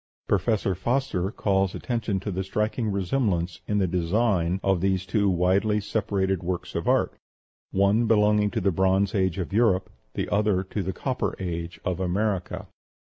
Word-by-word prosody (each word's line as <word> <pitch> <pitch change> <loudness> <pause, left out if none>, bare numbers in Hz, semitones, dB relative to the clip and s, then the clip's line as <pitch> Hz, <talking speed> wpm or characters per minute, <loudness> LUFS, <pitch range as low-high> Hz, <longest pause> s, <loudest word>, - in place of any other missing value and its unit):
Professor 100 0 +1
Foster 100 -1 -1
calls 95 -3 0
attention 115 -5 -2
to 100 +2 -4
the 95 +1 -2
striking 105 +4 -1
resemblance 95 -3 -1
in 105 - 0
the 100 - +3
designs 90 0 +1
of 95 -3 +2
these 95 -1 +1
two 100 0 +1
widely 95 +4 +2
separated 100 -3 -1
works 90 0 -4
of - - -3
art, - - +2 0.6
one 100 +4 +2
belonging 105 -1 +4
to - - -2
the 100 +1 +2
Bronze 95 +2 +2
Age 95 -4 +1
of 95 +1 -4
Europe, 100 -4 +2 0.2
the - - -1
other 100 -2 +2
to 100 +2 -4
the 95 0 -2
Copper 130 +7 -2
Age 85 -2 -4
of 90 -1 -1
America. 95 0 -1
95 Hz, 160 wpm, -26 LUFS, 90-105 Hz, 0.6 s, belonging